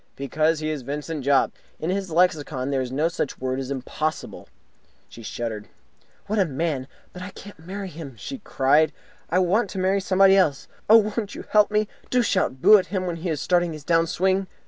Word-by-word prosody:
"Because 155 +4 0
he 155 - -2
is 150 -3 -4
Vincent 145 +3 -5
Jopp! 140 0 +3 0.3
In 165 - -2
his 195 -1 -2
lexicon 155 -6 +1
there 135 -1 +1
is 125 -1 -4
no 150 +5 +1
such 165 -4 -3
word 130 0 -2
as 135 -1 -5
impossible." 140 +4 -4 0.6
She 115 - -12
shuddered. 110 -2 -5 0.6
"What 210 +1 -1
a 195 - +4
man! 145 -3 -2 0.3
But 180 - -9
I 185 - -6
can't 200 0 -12
marry 190 +4 -6
him," 150 -6 -9
she 270 - -7
cried. 150 -3 +2 0.4
"I 175 - +1
want 185 +4 +2
to - - -7
marry 190 +1 +1
somebody 195 +1 +5
else. 160 -8 +2 0.2
Oh, 215 -1 +6
won't 215 -4 -3
you - - -7
help 210 -1 +5
me? 210 0 +1 0.2
Do 250 -1 +2
shout 130 - 0
'Boo!' 215 -1 +8
at 180 - -4
him 185 -2 -2
when 175 -2 -3
he 170 +2 -4
is 155 -3 -2
starting 175 -2 +1
his 155 -2 -9
down 165 +1 +2
swing!" 190 +2 +1
165 Hz, 205 wpm, -24 LUFS, 140-190 Hz, 0.6 s, Boo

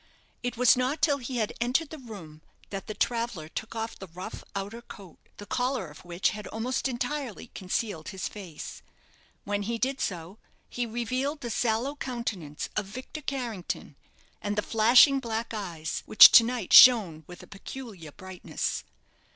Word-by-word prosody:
It 245 -1 -3
was 250 -1 +6
not 255 +4 -1
till 295 -2 +2
he 250 0 -5
had 215 -3 -1
entered 260 +6 +1
the 315 - -8
room 185 - -11 0.3
that 195 -1 -6
the 215 - -5
traveller 230 -9 -1
took 220 +7 -7
off 225 0 -4
the 190 - -8
rough 180 +2 -8
outer 200 +4 -5
coat, 195 -7 -13 0.2
the 205 - -9
collar 245 - -1
of 150 - -14
which 175 +1 0
had 210 -1 -7
almost 245 +5 -2
entirely 250 -2 -4
concealed 185 -3 -3
his 190 -2 -4
face. 185 -7 -9 0.6
When 205 0 -2
he 230 +3 -2
did 265 +3 -1
so, 180 +3 -4 0.3
he 245 -1 -3
revealed 255 +6 -2
the 240 -2 -4
sallow 235 +6 0
countenance 225 - -4
of 210 -2 -1
Victor 255 +8 -8
Carrington, 245 -10 -4 0.5
and 205 0 -2
the 210 - 0
flashing 240 +5 +6
black 230 -2 -4
eyes, 170 -7 -4
which - - +10
to 230 - +9
night 235 -4 -3
shone 200 -11 +8
with 180 0 -11
a - - -11
peculiar 200 - -9
brightness. 185 +3 -5
225 Hz, 165 wpm, -28 LUFS, 190-250 Hz, 0.6 s, which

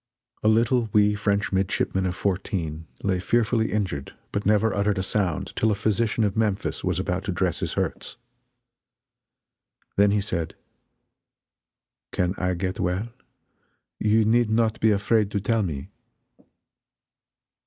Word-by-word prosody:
A - - +1
little 115 +1 +3
wee 105 0 +5
French 105 0 0
midshipman 95 0 0
of 90 - -2
fourteen 85 -5 -2 0.2
lay 95 -2 +1
fearfully 115 +2 +1
injured, 95 -10 -2 0.2
but 100 -1 -2
never 105 +1 +3
uttered 100 0 +1
a 95 - 0
sound 95 -5 -1
till 110 - +2
a 105 - +2
physician 110 +2 0
of 100 -2 0
Memphis 110 -3 -1
was - - 0
about - - -2
to - - -1
dress - - 0
his - - -2
hurts. - - -3 1.8
Then 100 +1 +5
he 105 +1 +2
said: 85 -5 -3 1.6
"Can 90 0 0
I 90 0 0
get 95 +2 -3
well? 95 +6 -1 0.9
You 110 +1 +3
need 115 +1 +3
not 110 0 +1
be 110 - +4
afraid 105 0 +2
to 100 - -1
tell 115 +3 +1
me." 75 -8 -4
100 Hz, 140 wpm, -25 LUFS, 95-110 Hz, 1.8 s, wee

